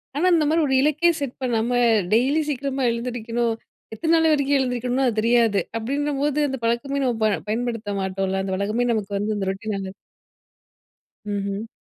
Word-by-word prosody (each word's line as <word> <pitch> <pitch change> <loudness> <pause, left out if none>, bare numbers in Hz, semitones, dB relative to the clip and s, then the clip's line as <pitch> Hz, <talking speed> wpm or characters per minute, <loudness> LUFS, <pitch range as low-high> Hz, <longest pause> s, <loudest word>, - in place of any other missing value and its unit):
ஆனா, 325 +5 +1
இந்த 310 -2 +2
மாதிரி 320 0 +2
ஒரு 265 - 0
இலக்கே 305 +4 +3
செட் 270 -3 -3
பண்ணாம 235 -1 0 0.4
டெய்லி 270 +7 +3
சீக்கிரமா 270 -1 -2
எழுந்திரிக்கணும், 235 -1 -2 0.4
எத்தனை 325 +8 0
நாள் 320 -1 +4
வரைக்கும் 280 -1 +2
எழுந்திரிக்கணும்னு 250 +1 0
அது 220 -2 0
தெரியாது. 230 -3 +3 0.2
அப்டின்னும்போது 285 +3 -1
அந்த 265 -2 -4
பழக்கமே, 275 +4 0
நம்ம 245 -2 +1
ப - - +5 0.2
பயன்படுத்த 230 -2 -2
மாட்டோம்ல 190 0 -1
அந்த 190 -1 -3
வழக்கமே 215 +5 0
நமக்கு 205 -2 -3
வந்து 210 +1 -1
அந்த 195 -1 -2
ரொட்டீனால. 195 -1 -5 1.3
ம்ஹ்ம். 200 +1 -3
240 Hz, 155 wpm, -23 LUFS, 215-275 Hz, 1.3 s, ப